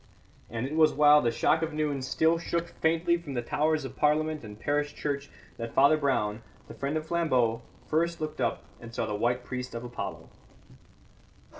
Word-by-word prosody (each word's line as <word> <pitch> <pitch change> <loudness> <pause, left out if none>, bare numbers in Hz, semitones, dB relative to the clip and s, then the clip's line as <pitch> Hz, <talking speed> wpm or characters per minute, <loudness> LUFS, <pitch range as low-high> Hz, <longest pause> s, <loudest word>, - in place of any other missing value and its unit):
And 115 +1 -3
it 145 +3 -4
was 155 -1 +5
while 150 0 +6
the 120 - +2
shock 155 +7 +2
of 160 -1 -2
noon 150 -3 -1
still 160 +5 +2
shook 170 0 -2
faintly 165 +1 +2
from 155 -6 -7
the 120 - -1
towers 155 +3 0
of 135 0 -7
Parliament 155 0 +1
and 105 -1 -10
parish 145 +2 -1
church 140 -1 -3 0.3
that 115 0 -6
Father 140 +3 +6
Brown, 115 -7 0 0.3
the - - -9
friend 140 +3 -2
of 155 - -4
Flambeau, 130 -9 +1 0.2
first 170 +2 0
looked 155 -1 -4
up - - -1 0.2
and 115 0 -10
saw - - 0
the 105 - -3
white 120 +4 0
priest 125 -1 -5
of 115 - -5
Apollo. 120 -5 -6
145 Hz, 185 wpm, -28 LUFS, 125-155 Hz, 0.3 s, while